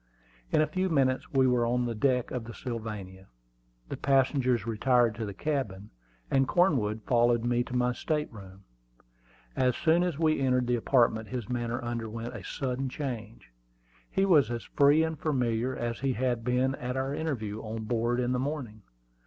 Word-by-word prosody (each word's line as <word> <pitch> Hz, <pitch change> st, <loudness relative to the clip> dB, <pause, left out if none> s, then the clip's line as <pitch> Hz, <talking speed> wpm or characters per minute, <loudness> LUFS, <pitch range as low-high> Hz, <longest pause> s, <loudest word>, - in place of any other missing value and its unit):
In -, -, +4 dB
a -, -, +4 dB
few 185 Hz, +5 st, -1 dB
minutes 135 Hz, -5 st, +1 dB
we 135 Hz, -2 st, +4 dB
were 125 Hz, -2 st, +3 dB
on 120 Hz, +1 st, +1 dB
the 120 Hz, -, -2 dB
deck 125 Hz, +2 st, +1 dB
of 125 Hz, -3 st, -4 dB
the 115 Hz, -, -9 dB
Sylvania. 105 Hz, -6 st, -6 dB, 0.6 s
The -, -, -5 dB
passengers 130 Hz, -4 st, +2 dB
retired 120 Hz, +1 st, +2 dB
to 110 Hz, -1 st, -4 dB
the 100 Hz, -, -5 dB
cabin, 105 Hz, -8 st, -3 dB, 0.4 s
and 135 Hz, -1 st, +3 dB
Cornwood 120 Hz, -, +2 dB
followed 120 Hz, 0 st, +2 dB
me 120 Hz, 0 st, +2 dB
to 125 Hz, -, -6 dB
my 125 Hz, 0 st, +2 dB
state 150 Hz, +1 st, -2 dB
room. 95 Hz, -2 st, -12 dB, 0.9 s
As 125 Hz, -2 st, +2 dB
soon 165 Hz, +4 st, +3 dB
as 175 Hz, -5 st, -1 dB
we 155 Hz, -2 st, +2 dB
entered 125 Hz, -2 st, +2 dB
the 120 Hz, 0 st, +1 dB
apartment 115 Hz, -2 st, +2 dB
his 125 Hz, -2 st, -5 dB
manner 120 Hz, -1 st, -2 dB
underwent 115 Hz, 0 st, -4 dB
a -, -, -7 dB
sudden 130 Hz, 0 st, -3 dB
change. 115 Hz, -, -6 dB, 0.6 s
He 195 Hz, -, +1 dB
was 150 Hz, -, +5 dB
as 120 Hz, -1 st, -3 dB
free 145 Hz, +2 st, +4 dB
and 160 Hz, -2 st, -3 dB
familiar 125 Hz, -4 st, 0 dB
as 120 Hz, -1 st, -3 dB
he 135 Hz, -1 st, 0 dB
had 120 Hz, -1 st, -1 dB
been 125 Hz, +2 st, +1 dB
at 125 Hz, -1 st, -4 dB
our 135 Hz, +1 st, -1 dB
interview 115 Hz, -10 st, -3 dB
on 110 Hz, 0 st, -5 dB
board 120 Hz, +2 st, 0 dB
in 125 Hz, 0 st, 0 dB
the 125 Hz, -, 0 dB
morning. 130 Hz, -6 st, -4 dB
125 Hz, 175 wpm, -29 LUFS, 115-135 Hz, 0.9 s, was